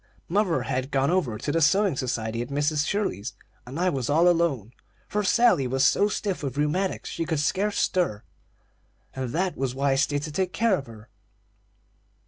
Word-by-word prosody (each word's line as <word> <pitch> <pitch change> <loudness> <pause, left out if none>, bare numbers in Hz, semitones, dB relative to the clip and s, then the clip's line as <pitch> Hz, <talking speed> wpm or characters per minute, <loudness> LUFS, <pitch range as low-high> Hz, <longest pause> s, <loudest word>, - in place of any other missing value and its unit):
"Mother 190 -2 +1
had 130 +1 -2
gone 140 +2 +1
over 140 -12 0
to 145 - -3
the 165 - +1
sewing 195 +2 +3
society 115 -3 -2
at 120 - -4
Mrs. 145 +1 0
Shirley's, 200 - -2 0.3
and 135 +6 -6
I 180 +1 +2
was 130 -4 -2
all 165 +4 +4
alone; 160 - +1 0.3
for 210 0 -1
Sally 200 - +3
was 135 +2 +1
so 205 - +4
stiff 200 -2 -3
with 140 -2 -4
rheumatics 165 +6 -1
she 165 - -3
could 160 -2 -1
scarce 200 +7 0
stir, 170 - 0 0.9
and 130 -2 -3
that 180 +7 -1
was 130 -1 -2
why 140 +1 +1
I - - +3
stayed 145 +1 +1
to 155 - -5
take 185 +3 -1
care 230 -2 +2
of 135 -7 -6
her. 110 -1 -13
150 Hz, 185 wpm, -25 LUFS, 130-185 Hz, 0.9 s, all